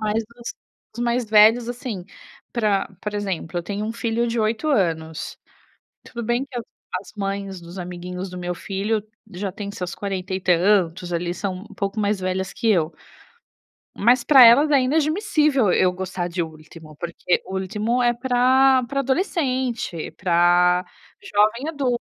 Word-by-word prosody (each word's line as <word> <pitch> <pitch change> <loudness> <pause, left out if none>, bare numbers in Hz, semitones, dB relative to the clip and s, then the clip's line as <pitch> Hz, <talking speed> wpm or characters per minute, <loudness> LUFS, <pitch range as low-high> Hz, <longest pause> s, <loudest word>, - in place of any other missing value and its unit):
Mas 215 +1 0 0.2
assim 235 - -7 0.4
os 240 - -2
mais 240 +1 +1
velhos 220 +2 +5
assim, 240 -6 -5 0.5
para, 210 -5 +1
por 210 0 -5
exemplo, 190 -5 -3
eu - - -3
tenho 205 +3 -4
um 225 - -3
filho 230 0 -1
de 230 0 -1
8 220 +7 0
anos 160 - -1 0.7
tudo 235 - -7
bem 240 +3 0
que 260 -3 -10
as 235 - -6 0.3
as 195 - -13
mães 195 -1 -4
dos 170 +2 -10
amiguinhos 180 +1 -6
do 180 - -7
meu 180 0 -3
filho 205 +4 -2 0.3
já 195 +1 -4
têm 200 +1 -6
seus 180 -3 -5
40 190 -2 -4
e 185 - -1
tantos 180 -1 +2
ali, 175 +1 -2
são 195 -1 -3 0.2
um - - -12
pouco 200 +2 -2
mais 205 0 +1
velhas 185 +1 -2
que 225 - +1
eu, 165 -5 +2 1.1
mas 240 +3 +3
pra 270 -4 +8
elas 275 +6 +7
é 280 - +5
inadmissível 300 - +2
eu 180 0 +3
gostar 185 -1 -4
de 175 0 -2
Ultimo, 155 -1 -11
porque 170 +2 -1
Ultimo 210 +6 -1
é 240 0 +3
para 260 +1 +4
para 275 +3 -1
adolescente, 260 - -1
para 180 0 +3 0.4
jovem 235 - +1
adulto, 265 -6 -1
205 Hz, 160 wpm, -22 LUFS, 180-240 Hz, 1.1 s, pra